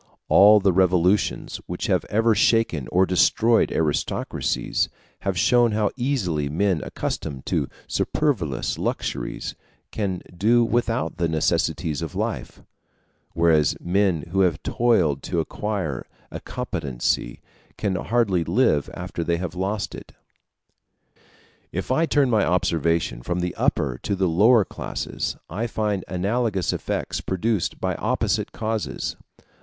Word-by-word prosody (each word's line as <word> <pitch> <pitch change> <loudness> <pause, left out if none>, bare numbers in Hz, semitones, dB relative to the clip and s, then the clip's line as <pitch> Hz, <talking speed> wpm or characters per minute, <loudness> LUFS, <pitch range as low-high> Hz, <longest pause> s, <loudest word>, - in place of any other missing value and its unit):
All 105 +2 +8
the 95 -2 +2
revolutions 90 +1 +2
which - - -4
have - - +1
ever 110 +2 +2
shaken 105 - +2
or 95 +2 +4
destroyed 110 +5 +3
aristocracies, 80 -3 -1 0.3
have 95 -2 -2
shown 120 +4 +4
how 105 -1 +1
easily 100 - -1
men 90 +1 +1
accustomed 65 -2 -4
to - - -1 0.2
superfluous 100 - -1
luxuries - - -3 0.4
can 95 -4 -2
do 115 +6 +3
without 115 -9 -1
the 85 -2 +1
necessaries 80 -1 0
of - - -5
life; - - -4 0.7
whereas 80 -3 +3
men 90 -3 +1
who 95 - 0
have 90 -5 +2
toiled 90 - +2
to 85 - -2
acquire 90 - -3 0.2
a - - -5
competency 70 - -2 0.4
can 100 -3 -1
hardly 100 -4 +1
live 85 - +2
after 90 -1 -4
they 85 +1 0
have 85 -2 -4
lost 100 +3 -2
it. - - -10 1.6
If 95 +6 -3
I 160 +6 +2
turn 145 -3 +3
my 110 -3 +3
observation 85 -6 0
from 90 +7 -2
the 90 0 -2
upper - - 0
to 100 - -1
the 95 -1 +1
lower 105 +6 +5
classes, - - -4
I 110 +8 -3
find 105 -4 -1
analogous 100 +1 0
effects - - -3
produced 95 +1 -1
by - - -1
opposite - - 0
causes. 110 -1 -3
95 Hz, 130 wpm, -23 LUFS, 85-110 Hz, 1.6 s, All